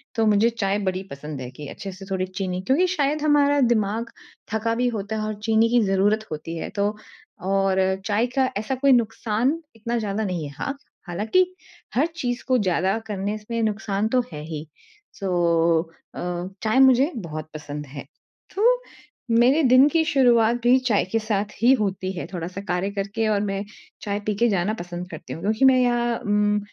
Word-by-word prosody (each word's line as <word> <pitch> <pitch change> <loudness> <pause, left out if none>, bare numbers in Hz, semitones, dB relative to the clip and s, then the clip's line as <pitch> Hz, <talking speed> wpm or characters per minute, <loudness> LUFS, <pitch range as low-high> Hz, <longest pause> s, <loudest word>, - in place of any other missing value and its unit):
तो 225 -1 +2
मुझे 215 +2 +4
चाय 205 -3 -1
बड़ी 185 +1 -4
पसंद 140 0 -7
है 125 - -6
कि 145 +3 -9
अच्छे-से 195 -1 -8
थोड़ी 185 -1 0
चीनी। 185 -1 -4
क्योंकि 275 - +2
शायद 290 +1 +1
हमारा 290 -1 +3
दिमाग 220 +1 0 0.4
थका 230 +1 0
भी 245 +1 +1
होता 205 +2 -4
है 215 - -2
और 215 - -3
चीनी 225 0 +3
की 240 0 +4
ज़रूरत 205 +3 +2
होती 155 +2 -5
है - - -4
तो 205 +1 0 0.5
और 195 0 +1 0.3
चाय 215 +3 +2
का 265 -1 +3
ऐसा 220 +6 -2
कोई 275 +1 +3
नुकसान 235 +3 +1 0.2
इतना 235 +2 -3
ज़्यादा 210 0 -2
नहीं 180 -5 -2
है। 140 - -10
हाँ, 280 0 -3 0.3
हालाँकि 215 - +2 0.5
हर 275 +6 +4
चीज़ 245 -6 -3
को 255 - +3
ज़्यादा 190 0 +1
करने 205 0 -2
से 230 +2 -4
नुकसान 210 -1 -1
तो 255 +2 +3
है 150 - -6
ही। 155 -1 -6 0.5
सो 195 - -4 0.9
अ, - - -6 0.4
चाय 220 +4 +2
मुझे 265 +4 +5
बहुत 155 -7 -6
पसंद 150 -1 -6
है। 140 +1 -8 0.5
तो 450 +5 +5 0.6
मेरे 245 +7 +5
दिन 255 +2 +6
की 330 0 +2
शुरुआत 240 -6 +4
भी 250 +2 +6
चाय 215 -5 +3
के 225 - +2
साथ 210 -1 -2
ही 245 - +6
होती 190 -2 -2
है। - - -4
थोड़ा-सा 180 +3 -5
कार्य 180 +2 0
करके 200 +3 -2
और 205 -1 +2
मैं 195 -1 -2 0.4
चाय 205 0 -2
पी 210 - +1
के 235 +3 +2
जाना 195 +1 0
पसंद 175 +1 -6
करती 155 - -8
हूँ 165 - -8
क्योंकि 215 +6 +2
मैं 260 -1 +6
यहाँ 240 -1 +1
उम, 210 0 +1
215 Hz, 185 wpm, -23 LUFS, 190-240 Hz, 0.9 s, दिन